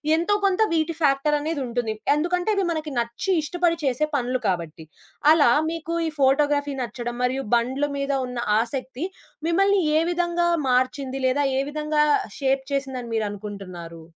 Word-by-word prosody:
ఎంతో 345 +5 +1
కొంత 390 +1 +2
వీటి 325 0 +1
ఫ్యాక్టరనేదుంటుంది. 275 -5 0 0.2
ఎందుకంటే, 355 +6 0
ఇవి 395 -1 +1
మనకి 310 -3 -3
నచ్చి 235 +11 -2
ఇష్టపడి 340 +2 0
చేసే 275 +2 +1
పనులు 255 -1 -1
కాబట్టి. 170 -3 -3 0.5
అలా 305 -3 +5 0.2
మీకు 330 0 -4
ఈ - - 0
ఫోటోగ్రఫీ 285 +1 +2
నచ్చడం, 240 0 -4
మరియు 260 +2 0
బండ్లు 260 +5 0
మీద 275 0 -1 0.2
ఉన్న 250 -1 -5 0.2
ఆసక్తి 260 +4 -4 0.4
మిమ్మల్ని 390 +3 +3 0.2
ఏ - - +2
విధంగా 345 0 +1 0.2
మార్చింది? 260 +1 0
లేదా 285 +3 +1 0.2
ఏ - - +2
విధంగా 300 0 +1 0.3
షేప్ 270 -1 +1
చేసింది 270 -1 -2
అని 235 - -8
మీరు 220 -1 0
అనుకుంటున్నారు? 185 -5 -8
275 Hz, 145 wpm, -24 LUFS, 245-320 Hz, 0.5 s, అలా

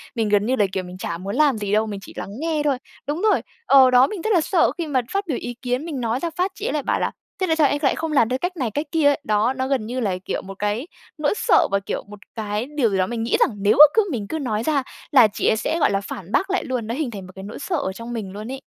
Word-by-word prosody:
mình 225 -2 0
gần 205 0 +3
như 260 +2 +1
là 205 - +3
kiểu 190 -1 -2
mình 180 +1 -9
chả 170 -3 -4
muốn 195 +3 -5
làm 295 -5 +3
gì 205 -1 -3
đâu, 215 +1 +3
mình 200 -2 -5
chỉ - - -11
lắng - - -6
nghe 320 -2 -1
thôi. 280 -3 +1 0.3
Đúng 300 +5 -2
rồi! 430 -1 +3 0.2
Ờ, 265 -2 +7
đó, 250 +1 +6
mình 390 -1 -6
rất 440 +2 +1
là 345 - +4
sợ 345 +2 +2
khi 335 -2 -3
mà 260 -3 +1
phát 395 -1 -1
biểu 280 - -1
ý 245 - -4
kiến, 250 +3 -2
mình 290 -7 -4
nói 230 +2 -1
ra 340 - -2
phát 370 +2 0
chị - - -6
ấy - - -1
lại 295 -3 -1
bảo - - 0
là - - 0 0.3
"Thế 375 - +2
tại 320 - +2
sao 305 -3 +4
em 290 - 0
lại 275 - +2
không 325 -1 -3
làm 235 -6 +3
theo 255 +1 -1
cách 360 0 -3
này, 245 -7 -1
cách 290 +7 -2
kia?" 320 -3 +3
ấy. 285 +1 +3
Đó, 215 +4 +1
nó 260 0 -2
gần 265 -5 0
như 250 +3 -3
là, 195 -6 -1
kiểu, - - -2
một 195 0 -10
cái 210 +9 -1 0.3
nỗi 300 +4 +1
sợ 445 -8 +4
và, 200 - +2
kiểu, 195 - -4
một 205 0 -11 0.2
cái 215 +1 -2
điều 235 -6 +3
gì 195 - -1
đó 185 -1 +1
mình 230 -1 -3
nghĩ 230 - +1
rằng - - +4
nếu 205 +1 +4
mà 300 - +13
cứ 440 -2 +3
mình 210 -6 -3
cứ 320 - -3
nói 220 -5 -2
ra 280 -1 +1 0.3
là 250 -6 +7
chị - - -1
ấy 220 - +3
sẽ 325 +9 -1
gọi - - +3
là 195 0 0
phản 195 -1 -8
bác 385 +9 +1
lại 380 - 0
luôn, 245 -4 -3
nó 230 - -2
hình 285 -5 -2
thành 195 -3 -7
một - - -12
cái 190 - -8
nỗi 210 - -8
sợ 355 - -2
ở 190 - -2
trong 230 +3 -7
mình 210 -5 -5
luôn 215 +5 -7
ấy. 270 0 -6
250 Hz, 325 wpm, -22 LUFS, 210-305 Hz, 0.3 s, mà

